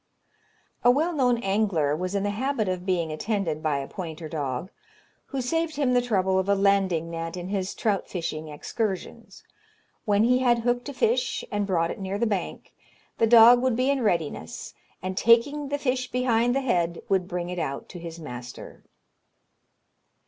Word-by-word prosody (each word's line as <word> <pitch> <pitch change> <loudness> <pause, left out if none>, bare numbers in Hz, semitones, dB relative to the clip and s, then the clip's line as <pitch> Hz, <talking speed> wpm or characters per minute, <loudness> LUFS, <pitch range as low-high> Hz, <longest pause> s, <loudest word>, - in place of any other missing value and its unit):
A 245 - +6
well 310 +7 +2
known 250 -5 +2
angler 195 -8 +1
was 185 +4 -3
in 200 - 0
the 205 - 0
habit 240 0 -1
of 185 0 -3
being 170 -4 0
attended 165 -2 -2
by 155 -3 0
a 135 0 -4
pointer 165 -3 -7
dog, 145 +2 -4 0.6
who 270 -2 -3
saved 325 +4 -1
him 275 -3 +1
the 245 - +4
trouble 190 -5 +1
of 190 +1 -2
a 200 - +4
landing 195 -4 +2
net 165 +1 -5
in 180 +1 -6
his 195 -1 -2
trout 205 -3 -1
fishing 160 -3 -4
excursions. 190 +6 -5 0.6
When 205 -1 +3
he 250 +2 +4
had 240 -2 +3
hooked 245 +3 -1
a - - -6
fish 460 - 0
and 205 -1 -1
brought 170 -3 +1
it - - -7
near 195 +1 -3
the 235 - +1
bank, 205 -5 -3 0.5
the 225 - +4
dog 235 +1 +8
would 255 -2 +1
be 255 +3 +2
in 275 -2 0
readiness, 165 - -2 0.3
and 185 0 -3
taking 270 +8 +3
the 285 - -1
fish 255 -2 -1
behind 245 -1 +1
the 275 - +1
head, 175 -9 0
would 190 -2 +1
bring 180 -1 -4
it 180 - -4
out 140 -3 -4
to 175 - -9
his 165 -1 -8
master. 125 -5 -9
200 Hz, 180 wpm, -26 LUFS, 170-245 Hz, 0.6 s, dog